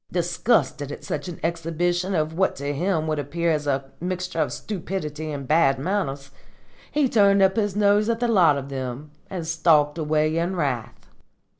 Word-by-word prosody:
Disgusted 165 - 0
at - - -8
such 150 +2 -4
an 175 - -7
exhibition 175 +3 -1
of 155 -1 0
what 190 +3 +1
to 140 +1 -3
him 165 +1 0
would 155 -1 -1
appear 165 +4 -1
as 150 -2 -1
a 135 -1 -1
mixture 180 -1 -3
of 155 - +1
stupidity 160 -6 -5
and 140 -2 -5
bad 150 -3 +4
manners, 140 -4 -2 0.6
he 295 -2 +2
turned 200 -4 +4
up 190 0 +3
his 205 -3 0
nose 205 +1 +3
at 230 0 0
the 240 - +1
lot 175 -10 +4
of 140 0 -6
them 135 +2 -5 0.2
and 180 -4 -4
stalked 160 -2 +3
away 155 0 +1
in 175 +3 -1
wrath. 125 -8 -3
160 Hz, 175 wpm, -24 LUFS, 145-185 Hz, 0.6 s, bad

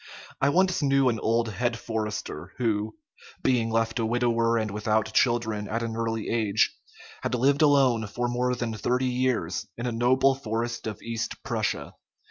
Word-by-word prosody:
I 140 - +4
once 185 +3 +2
knew 135 -2 +3
an 115 -2 -1
old 115 0 +1
head 120 +2 -1
forester, 110 -2 -4
who, 110 -3 -1 0.5
being 120 -3 +2
left 115 +1 0
a 115 - +1
widower 115 -1 +2
and 110 -2 -1
without 105 +1 0
children 110 -4 +1
at 115 +1 -2
an 115 -1 -3
early 115 -1 -2
age, 110 -2 +1 0.5
had - - -1
lived 140 +5 +2
alone 135 -7 +4
for 120 +4 -2
more 125 +1 0
than 120 -2 -3
thirty 125 +5 0
years 125 -6 -1
in 120 - -4
a 125 - -1
noble 130 +4 +3
forest 120 -2 -3
of 110 -1 -6
East 115 0 -4
Prussia. - - -2
115 Hz, 165 wpm, -26 LUFS, 110-125 Hz, 0.5 s, I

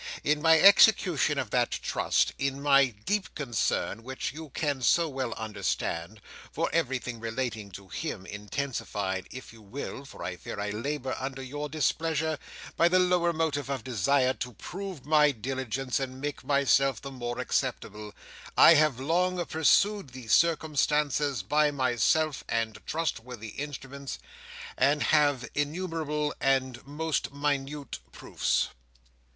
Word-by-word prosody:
In 150 0 +1
my 160 0 +6
execution 195 -3 +6
of - - -2
that - - +2
trust; - - 0
in 140 0 -1
my 140 -1 +5
deep 180 - -3
concern, 120 -4 -1
which 130 +2 -5
you 160 0 -8
can 145 -1 -2
so 165 +7 +3
well 130 -4 -3
understand, 105 -3 -3 0.3
for - - -1
everything 125 -2 -1
relating 115 -2 -3
to 100 +1 -10
him, 105 - -5
intensified, 105 -3 -4
if 130 -2 -10
you 115 - -15
will 130 +5 -7
(for - - -10
I 90 0 -4
fear 95 - -7
I 105 0 -2
labour 130 +4 -3
under 135 0 -5
your 145 +3 -5
displeasure), 160 +1 0 0.4
by 170 - +4
the 180 +1 +3
lower 180 -1 +3
motive 155 -4 -1
of 135 -4 -3
desire 130 +2 +2
to 125 +1 -6
prove 185 - -7
my 150 0 +5
diligence, 130 +1 -2
and 130 -1 -5
make 145 +1 -4
myself 135 -2 +3
the 140 - -8
more 120 -2 -5
acceptable; 105 0 -2 0.5
I 165 - +9
have 150 -5 +3
long 175 +5 0
pursued 160 +1 +2
these 125 -4 -3
circumstances 150 - +2
by 150 +8 +3
myself 135 +3 +1
and 115 -1 -1
trustworthy 125 -8 -3
instruments, 140 +1 -6 0.6
and 145 +3 +3
have 145 -5 +3
innumerable 150 -1 -2
and 130 -2 +1
most 155 +1 -2
minute 140 -1 -2
proofs." - - -1
140 Hz, 135 wpm, -28 LUFS, 125-150 Hz, 0.6 s, I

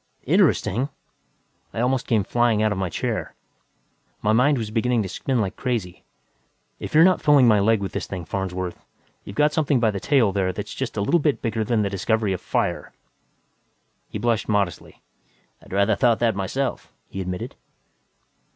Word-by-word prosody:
"Interesting?" 125 +8 +2 0.9
I - - -2
almost 125 +1 0
came 110 -4 +2
flying 115 +1 +2
out 110 - +2
of 105 - -2
my 95 -2 -1
chair. - - -3 0.9
My 105 - +3
mind 135 +5 +4
was 110 -3 -4
beginning 115 0 +1
to - - -4
spin 130 +5 -1
like 100 -4 -1
crazy. 110 -9 -3 0.8
"If - - -6
you're 160 - +8
not 185 +1 +4
pulling 145 -4 +5
my 105 -2 +5
leg 110 +1 +3
with 95 - -3
this - - -4
thing, 90 -4 -6
Farnsworth, 95 0 -4 0.4
you've 100 - -9
got 150 +3 +3
something 145 -4 +2
by 115 -2 +2
the 100 - -4
tail 125 -3 +3
there 95 -1 0
that's - - -6
just - - -4
a - - +1
little 170 +12 +2
bit 150 -2 +1
bigger 110 -2 -1
than 110 -1 +1
the 100 - -1
discovery 105 +1 0
of 90 - -5
fire." - - -2 1.2
He - - -5
blushed 115 -3 0
modestly. 100 -5 -2 0.6
"I'd - - -17
rather 100 +3 +2
thought 120 -2 +3
that 115 -2 +2
myself," 100 +8 -3 0.2
he 95 - -6
admitted. 90 -1 -5
110 Hz, 180 wpm, -23 LUFS, 100-125 Hz, 1.2 s, you're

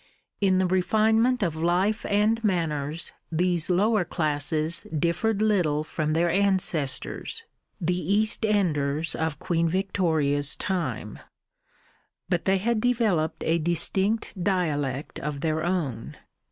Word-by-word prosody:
In 190 -2 +3
the 185 - +2
refinement 220 +6 +2
of 165 -4 -1
life 180 +7 0
and 215 +3 +2
manners 160 -5 -1 0.2
these 175 0 +1
lower 205 +3 +3
classes 155 -1 0
differed 170 +7 0
little 175 -9 +2
from 155 0 -2
their 170 +2 +2
ancestors, 185 - 0 0.4
the 180 0 0
East 215 +2 +1
enders 160 -8 +1
of 160 -1 -2
Queen 165 -1 0
Victoria's 160 -6 0
time; 130 - -3 1.1
but 175 -3 0
they 195 0 +3
had 220 +3 0
developed 220 -10 +1
a 165 +1 +1
distinct 185 +4 0
dialect 150 -8 -1
of 145 -1 -4
their 160 0 0
own. 155 -11 -3
175 Hz, 115 wpm, -26 LUFS, 155-200 Hz, 1.1 s, In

